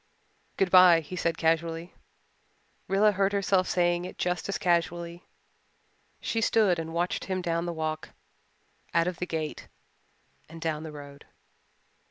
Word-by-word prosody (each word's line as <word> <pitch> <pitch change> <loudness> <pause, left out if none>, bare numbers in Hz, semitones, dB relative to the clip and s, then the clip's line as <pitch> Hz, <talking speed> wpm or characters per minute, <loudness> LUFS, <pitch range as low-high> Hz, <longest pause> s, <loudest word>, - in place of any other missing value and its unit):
"Good 190 -2 +1
bye," 180 -3 +8
he 160 +4 -8
said 170 -2 -1
casually. 165 +1 0 0.9
Rilla 205 +2 +4
heard 195 0 +1
herself 195 -2 +2
saying 175 -1 +1
it 180 - -8
just 180 +1 -2
as 200 - -1
casually. 170 0 -1 1.0
She 225 - -2
stood 210 -6 +3
and 165 0 -5
watched 175 +2 -1
him 185 -1 -2
down 170 -1 -1
the - - -1
walk, 155 -1 -4 0.9
out 170 0 +4
of 180 -1 -3
the 180 - -4
gate, 160 -2 -4 0.8
and 165 +1 -10
down 160 -2 -2
the 160 -1 -7
road. 145 -1 -11
170 Hz, 145 wpm, -28 LUFS, 165-185 Hz, 1.0 s, bye